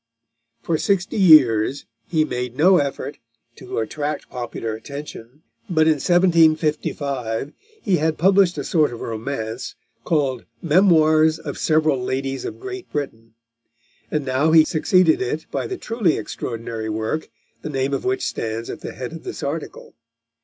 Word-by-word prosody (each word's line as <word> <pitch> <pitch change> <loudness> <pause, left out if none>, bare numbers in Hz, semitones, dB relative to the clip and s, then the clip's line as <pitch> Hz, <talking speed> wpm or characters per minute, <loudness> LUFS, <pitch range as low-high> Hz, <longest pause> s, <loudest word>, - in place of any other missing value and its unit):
For 160 -2 0
sixty 195 +1 0
years 140 - +5 0.2
he 160 -2 +1
had 155 - 0
made 125 0 -3
no 180 +5 +6
effort 140 0 -3 0.4
to - - -7
attract 145 +6 -3
popular 120 -2 -4
attention, 140 +2 -9 0.3
but 160 -3 +3
in 155 -1 +3
1755 155 -7 +1 0.3
he 195 -6 +2
had 155 +1 0
published 190 0 +4
a - - -2
sort 155 -6 +2
of 120 - -8
romance, 115 +1 -5 0.3
called 140 -7 0
Memoirs 160 -2 +4
of 155 -3 -7
Several 155 -4 +2
Ladies 135 +1 -3
of - - -6
Great 380 -1 -8
Britain, 115 -6 -5 0.7
and 150 -2 -2
now 135 +4 +1
he 160 -1 +7
succeeded 185 - +3
it 395 +2 -2
by - - -2
the 380 - -5
truly 220 - 0
extraordinary 115 -1 -5
work, 110 +8 -3 0.3
the 155 - -5
name 135 -1 -1
of - - -2
which 385 0 -1
stands 115 +1 -3
at - - -8
the - - -6
head - - -6
of - - -9
this - - -7
article. - - -5
150 Hz, 150 wpm, -21 LUFS, 125-165 Hz, 0.7 s, he